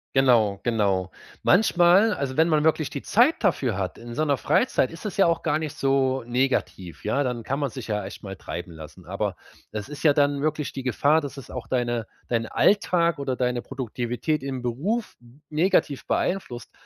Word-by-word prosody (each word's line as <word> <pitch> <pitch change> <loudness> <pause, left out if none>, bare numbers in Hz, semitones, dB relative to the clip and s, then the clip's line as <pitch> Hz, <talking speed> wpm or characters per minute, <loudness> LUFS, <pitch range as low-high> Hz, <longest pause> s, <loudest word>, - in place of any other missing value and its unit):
Genau, 115 -7 +4
genau. 100 -6 0 0.3
Manchmal 185 +2 +5
also, 135 -1 -3
wenn 160 +1 +5
man 155 -2 +2
wirklich 155 -2 +1
die 140 - -5
Zeit 245 +9 +4
dafür 130 - +1
hat 95 - -3
in 120 0 -9
seiner 145 -1 +1
Freizeit, 130 - +1
ist 165 - -11
es 200 - -6
ja 195 - +5
auch 170 -1 +1
gar 155 -2 +1
nicht 155 -2 -5
so 135 -2 +1
negativ, 120 -8 -1
ja? 135 +7 +1
Dann 125 -2 -2
kann 135 +5 -2
man 140 -4 -1
sich 130 -4 -7
ja 105 -2 -2
echt 100 - -9
mal 95 -1 -7
treiben 85 -1 -7
lassen, 80 -2 -12
aber - - -2 0.4
das 105 +5 -5
ist 150 - -8
ja 145 -2 +6
dann 145 -1 +2
wirklich 155 -2 -1
die 135 - -6
Gefahr, 140 +5 +3
dass 140 -2 -7
es 135 - -10
auch 125 - -6
deine 120 -3 -1 0.2
deinen 115 -1 0
Alltag 170 - +2
oder 135 -2 -2
deine 125 -1 -1
Produktivität 130 +3 -3
im 130 -2 -4
Beruf 165 - -2 0.3
negativ 155 -3 +1
beeinflusst. 150 -11 -2
135 Hz, 190 wpm, -25 LUFS, 120-155 Hz, 0.4 s, ja